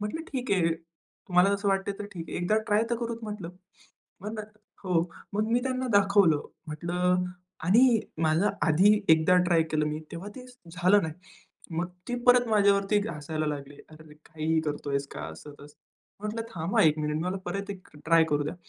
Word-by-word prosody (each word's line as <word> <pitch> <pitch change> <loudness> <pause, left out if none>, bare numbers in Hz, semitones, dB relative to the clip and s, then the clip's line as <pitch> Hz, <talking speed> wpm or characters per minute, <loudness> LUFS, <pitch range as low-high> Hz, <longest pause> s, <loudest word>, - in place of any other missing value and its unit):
म्हटलं 210 +11 -4
ठीक 255 -2 -3
आहे. 165 -4 +2 0.6
तुम्हाला 180 +2 +4
असं 200 0 -1
वाटतं 195 0 0
आहे 195 - -15
तर 205 - -5
ठीक 165 -3 -7
आहे. - - -5
एकदा 180 +5 +1
ट्राय 210 +1 +3
तर 235 - +1
करू 235 0 -3
म्हटलं. 210 -5 -6 1.4
हो 175 -3 +2 0.3
मग 210 +2 0
मी 245 - +3
त्यांना 260 0 -2
दाखवलं. 200 -6 +4 0.2
म्हटलं 180 +4 0 0.4
आणि 230 +5 +5 0.2
माझं 160 +6 +3
आधी 175 +6 +5 0.2
एकदा 160 +3 +4
ट्राय 170 -2 +3
केलं 155 -1 +1
मी 150 0 -2
तेव्हा 170 +4 -6
ते 250 - -9 0.3
झालं 185 +3 +4
नाही. 160 -2 -4 0.6
मग 170 +2 0 0.2
ती 245 - -1
परत 245 -1 +6
माझ्यावरती 200 -1 +3
हसायला 155 0 -4
लागले. 145 -1 -5 0.2
अरे 155 -1 -15
काहीही 160 0 -1
करतोयेस 145 -2 -2
का - - -6
असं 115 - -11
तसं. 145 +1 -14 0.4
म्हटलं 210 +2 -3
थांबा 170 -2 +1
1 155 -1 +4
मिनिट 150 0 -1
मी - - -2
म्हणलं 180 +3 -2
परत 200 +3 -4
एक 190 -2 -8 0.2
ट्राय 165 0 +5
करू 145 0 +2
द्या. 150 - -4
180 Hz, 175 wpm, -27 LUFS, 155-205 Hz, 1.4 s, परत